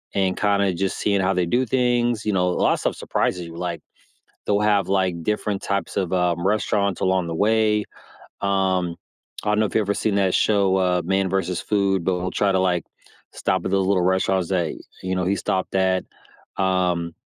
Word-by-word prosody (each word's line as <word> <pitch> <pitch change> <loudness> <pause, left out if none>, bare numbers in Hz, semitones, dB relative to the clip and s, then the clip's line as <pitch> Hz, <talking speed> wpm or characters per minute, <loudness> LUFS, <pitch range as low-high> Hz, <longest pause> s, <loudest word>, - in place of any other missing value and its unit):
and 95 -1 +1
kinda 100 -2 +2
just 95 +2 -2
seeing 100 -1 +1
how 95 +1 +1
they 90 -2 +1
do 125 +9 +1
things, 120 -2 +1
you 105 - +1
know, 90 -1 +2
a - - +1
lotta - - +2
stuff - - -2
surprises 90 -1 -1
you, 85 - -10
like, 85 -1 -4 0.7
they'll 105 0 +2
have, 105 -2 +2
like, 95 -3 0
different 105 +1 -1
types 100 0 -2
of, 95 -4 0
um, 90 -1 +1
restaurants 100 -2 0
along 95 -1 +1
the 85 - -3
way. 105 +3 +2 0.6
Um, 95 -3 0 0.5
I 105 - -1
don't 105 - +1
know 110 - +3
if - - -11
you've 110 - +4
ever 100 0 0
seen 105 -2 0
that 95 -2 +2
show, 100 -3 +2
uh, 90 -1 +1
Man 95 +1 +1
v. 95 +1 +1
Food, 95 -2 0
but 90 0 +1
we'll 90 +1 -3
try 100 -1 +1
to, 95 - +2
like, 90 -2 +1 0.5
stop 95 -2 -1
at - - -2
those 95 -1 +2
little 95 -3 +2
restaurants 95 0 +1
that, 90 -4 0 0.3
you 95 0 -1
know, 90 -1 -1
he 95 +2 +1
stopped 95 -1 -2
at. 95 -1 +1 0.5
Um, 90 -3 0
95 Hz, 200 wpm, -22 LUFS, 90-100 Hz, 0.7 s, you've